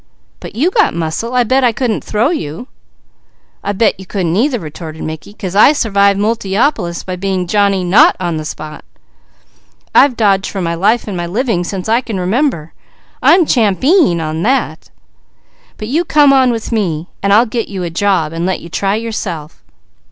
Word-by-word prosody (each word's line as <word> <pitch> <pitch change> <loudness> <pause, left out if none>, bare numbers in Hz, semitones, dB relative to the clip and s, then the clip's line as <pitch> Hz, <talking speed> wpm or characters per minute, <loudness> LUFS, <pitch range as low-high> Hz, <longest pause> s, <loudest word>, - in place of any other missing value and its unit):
"But - - -10
you 310 +11 +1
got 425 - +2
muscle. 170 +9 -3
I 250 - +4
bet 260 +3 +1
I 245 - +4
couldn't 230 -1 -2
throw 230 +8 0
you!" 175 - -5 1.0
"I 200 - -1
bet 210 +1 +1
you 190 - -11
couldn't 175 -4 -2
either," 250 +5 +1
retorted 160 -1 -8
Mickey, 160 +5 -7
"'cause 195 -3 -6
I 215 +8 +6
survived 200 -7 +2
Multiopolis 205 - -1
by 185 - -4
being 185 0 -2
Johnny 200 0 +1
not 180 +3 +5
on 175 -3 -2
the 155 - -4
spot! 155 0 -8 1.1
I've 265 -4 +4
dodged 200 -3 +2
for 195 - -5
my 170 -2 -1
life 210 +8 +1
and 200 - -4
my 175 -1 -3
living 210 -1 -1
since 185 +1 -5
I 230 +3 +2
can 220 -6 -5
remember. 185 - -1 0.5
I'm 345 0 +5
champeen 250 - +2
on 160 0 -3
that. 225 -8 -1 0.9
But 215 - -6
you 310 +8 0
come 295 -4 +4
on 260 -2 +4
with 230 0 -4
me, 175 -7 -2
and 200 - 0
I'll 220 +4 +5
get 230 0 -3
you 190 -3 -5
a 170 - -4
job 170 -3 0
and 165 +1 -3
let 185 +1 -1
you 170 - -11
try 195 +4 -1
yourself." 195 -9 -5
200 Hz, 180 wpm, -14 LUFS, 175-235 Hz, 1.1 s, I